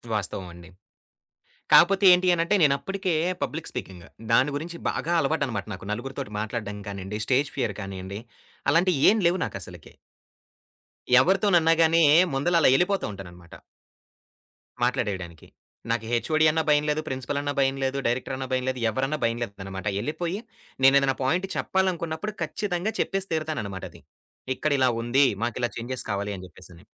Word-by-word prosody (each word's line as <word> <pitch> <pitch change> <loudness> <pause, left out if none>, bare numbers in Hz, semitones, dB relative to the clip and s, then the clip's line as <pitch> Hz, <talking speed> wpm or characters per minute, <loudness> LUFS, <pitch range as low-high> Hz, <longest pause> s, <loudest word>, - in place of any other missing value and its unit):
వాస్తవం 95 -2 -3
అండి. 85 0 -13 1.0
కాపోతే 195 +3 +6
ఏంటి 180 +1 +3
అనంటే 170 +4 +1
నేనప్పటికే 180 +5 +1 0.3
పబ్లిక్ 160 +1 -3
స్పీకింగ్. 90 -3 -8 0.3
దాని 130 +5 +4
గురించి 170 +3 -5
బాగా 170 - -3
అలవాటన్నమాట 135 -11 -1
నాకు 95 - -10
నలుగురితోటి 120 -2 -5
మాట్లాడడం 105 -2 -4
కానియండి, 100 +1 -5
స్టేజ్ 140 +2 +1
ఫియర్ 135 - -1
కానియండి, 95 +1 -6 0.5
అలాంటియేం 175 +5 +4
లేవు 175 +2 +2
నాకసలకి. 90 -4 -8 1.3
ఎవరితోనన్నా 180 -1 +3
గాని 165 +1 +4
యే 145 - +6 0.2
ముందల 170 +6 +1
అలా - - +6
ఎళ్ళిపోతూ 190 +6 +1
ఉంటానన్నమాట. 90 -3 -12 1.3
మాట్లాడేయడానికి. 100 -10 -2 0.4
నాకు 115 -1 -1
హెచ్ఓడి 155 +6 +2
అన్నా 160 +1 +1
భయం 150 0 +4
లేదు. 150 +1 0
ప్రిన్సిపల్ 135 +1 -3
అన్నా 145 0 -2
భయం 135 0 +2
లేదు. 135 +1 -1
డైరెక్టర్ 130 +2 -2
అన్నా 130 0 -5
భయం 130 0 0
లేదు. 130 -1 -3
ఎవరన్నా 135 +5 -1
భయం 115 0 +1
లేదన్నమాట. 95 -2 -7
ఎళ్ళిపోయి 170 - -3 0.5
నేనేదైనా 135 0 +5
పాయింట్ 175 +8 0
చెప్పాలనుకున్నప్పుడు 185 0 -1
ఖచ్చితంగా 180 +5 -2
చెప్పేసి 195 0 -2
తీరుతానన్నమాట 140 - -3
అది. - - -15 0.6
ఇక్కడిలా 140 -4 +2
ఉంది. 130 +4 +4 0.2
మాకిలా 120 +1 -1
చేంజెస్ 125 +2 -5
కావాలి 100 +1 -2
అని 95 -1 -9
జెప్పేసని. 85 -1 -16
135 Hz, 135 wpm, -25 LUFS, 105-165 Hz, 1.3 s, కాపోతే